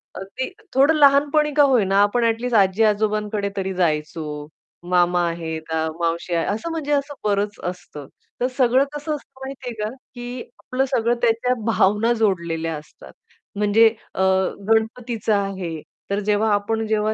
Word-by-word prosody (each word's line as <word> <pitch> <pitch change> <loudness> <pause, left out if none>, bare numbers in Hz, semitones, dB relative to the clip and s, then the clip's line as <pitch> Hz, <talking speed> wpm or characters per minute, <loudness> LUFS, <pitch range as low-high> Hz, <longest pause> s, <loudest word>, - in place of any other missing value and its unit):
अगदी 195 +7 -5 0.2
थोडं 280 +4 +4
लहानपणी 290 +1 +4
का 290 - +5
होईना, 205 -8 +3
आपण 205 +4 +2
ऍटलिस्ट 230 +1 0
आजी-आजोबांकडे 210 +1 +1
तरी 190 0 -2
जायचो, 150 -3 -2 0.4
मामा 175 0 +3
आहे 165 -1 -4
का, 160 0 0
मावशी 170 +1 -1
आहे, 165 - +1
असं 220 +11 -2
म्हणजे 310 -3 -3
असं 285 0 0
बरंच 205 0 -1
असतं. 175 -5 -7 0.3
तर 250 - +3
सगळं 255 0 +4
कसं 295 +1 -3
असतं 275 -2 -14
माहितीये 260 -2 -6
का 210 - -1 0.3
की 245 +1 -6 0.2
आपलं 260 +1 0
सगळं 235 -1 +1
त्याच्या 235 +1 +2
भावना 220 0 +2
जोडलेल्या 170 -7 -1
असतात. 150 - -14 0.4
म्हणजे 210 +2 +5 0.3
अ, - - -2 0.5
गणपतीचा 225 -1 +1
आहे, 185 -5 -4 0.3
तर 200 +1 0
जेव्हा 210 +1 +2
आपण 220 +2 0
जेव्हा 215 0 +1
215 Hz, 145 wpm, -22 LUFS, 185-245 Hz, 0.5 s, का